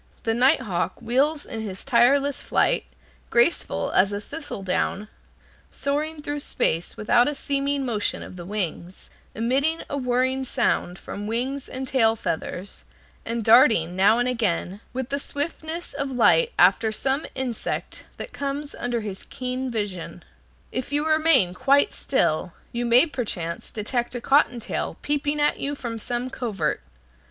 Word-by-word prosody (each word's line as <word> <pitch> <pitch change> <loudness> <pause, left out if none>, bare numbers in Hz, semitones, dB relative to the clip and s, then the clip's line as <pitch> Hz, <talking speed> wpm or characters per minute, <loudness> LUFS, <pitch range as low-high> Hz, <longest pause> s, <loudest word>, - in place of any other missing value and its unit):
The 225 - +1
night 255 +3 +4
hawk 190 -5 -2
wheels 275 +6 +1
in 225 -2 -5
his 195 -3 -6
tireless 275 +3 +3
flight, - - +1 0.4
graceful 240 +8 +2
as 195 +2 +4
a 205 - -2
thistledown, 210 - -3 0.6
soaring 300 +2 -2
through 290 -1 -3
space 170 - -1
without 240 +3 +3
a 295 - -1
seeming 280 0 -1
motion 220 -4 -1
of - - -10
the 175 - -8
wings, 185 -2 -4 0.2
emitting 275 +8 +1
a 285 - -1
whirring 260 +1 +1
sound 180 -7 0
from 205 +1 -7
wings 255 +5 -2
and 260 +1 -5
tail 225 -4 +3
feathers, 185 -1 -4 0.4
and 230 0 -2
darting, 220 -7 +5
now 200 +4 +5
and 245 +1 +1
again, 205 -5 -1
with 260 0 -4
the 280 - -1
swiftness 315 +4 -4
of 280 -1 -3
light 365 - +4
after 220 -1 +5
some 270 +6 -1
insect 255 -4 -4
that - - -7
comes 285 +1 -4
under 240 -1 -2
his 200 -3 -7
keen 255 +1 -3
vision. 205 -7 -4 0.5
If 255 +1 -4
you 295 +1 +1
remain 310 - +4
quite 275 +8 +3
still, 170 - 0 0.2
you 240 0 -2
may 240 +6 +6
perchance 205 - -4
detect 240 +3 -2
a - - -2
cotton 245 -1 +3
tail 225 - -4
peeping 290 0 0
at 295 - +2
you 285 +1 -2
from 235 -4 -5
some 245 +3 -3
covert. 220 - -2
245 Hz, 150 wpm, -24 LUFS, 215-280 Hz, 0.6 s, may